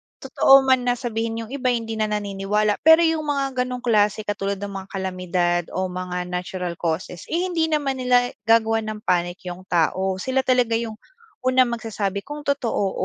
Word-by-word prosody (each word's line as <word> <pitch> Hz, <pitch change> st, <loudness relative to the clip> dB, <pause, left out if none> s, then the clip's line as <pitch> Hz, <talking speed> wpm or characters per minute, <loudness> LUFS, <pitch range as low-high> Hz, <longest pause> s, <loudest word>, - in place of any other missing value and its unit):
Totoo 270 Hz, 0 st, +5 dB
man 260 Hz, -2 st, +3 dB
na 245 Hz, -, +3 dB
sabihin 230 Hz, -1 st, -3 dB
yung 225 Hz, -, -11 dB
iba 270 Hz, -2 st, -2 dB
hindi 230 Hz, -2 st, -1 dB
na 215 Hz, -, +1 dB
naniniwala 210 Hz, 0 st, -1 dB
pero 320 Hz, +2 st, +7 dB
yung 320 Hz, -2 st, +1 dB
mga 275 Hz, -3 st, 0 dB
gano'ng 250 Hz, 0 st, -4 dB
klase 215 Hz, -2 st, +2 dB
katulad 200 Hz, -1 st, -2 dB
ng 200 Hz, +1 st, -6 dB
mga 190 Hz, -1 st, -7 dB
kalamidad 180 Hz, -2 st, -1 dB
o 185 Hz, -, 0 dB
mga 180 Hz, 0 st, -4 dB
natural 180 Hz, 0 st, -3 dB
causes, 170 Hz, +1 st, -3 dB
eh, 345 Hz, +3 st, 0 dB
hindi 335 Hz, -3 st, 0 dB
naman 290 Hz, -4 st, -1 dB
nila 250 Hz, -1 st, +3 dB, 0.2 s
gagawa 225 Hz, 0 st, +4 dB
ng 215 Hz, -1 st, -6 dB
panic 175 Hz, +1 st, 0 dB
yung 180 Hz, +1 st, -7 dB
tao 185 Hz, +3 st, +1 dB
sila 260 Hz, +7 st, -1 dB
talaga 250 Hz, -2 st, +2 dB
yung 225 Hz, -2 st, -5 dB, 0.5 s
unang 255 Hz, 0 st, +4 dB
magsasabi 215 Hz, -4 st, -3 dB
kung 295 Hz, +1 st, -7 dB
totoo 235 Hz, -8 st, 0 dB
220 Hz, 175 wpm, -23 LUFS, 190-255 Hz, 0.5 s, pero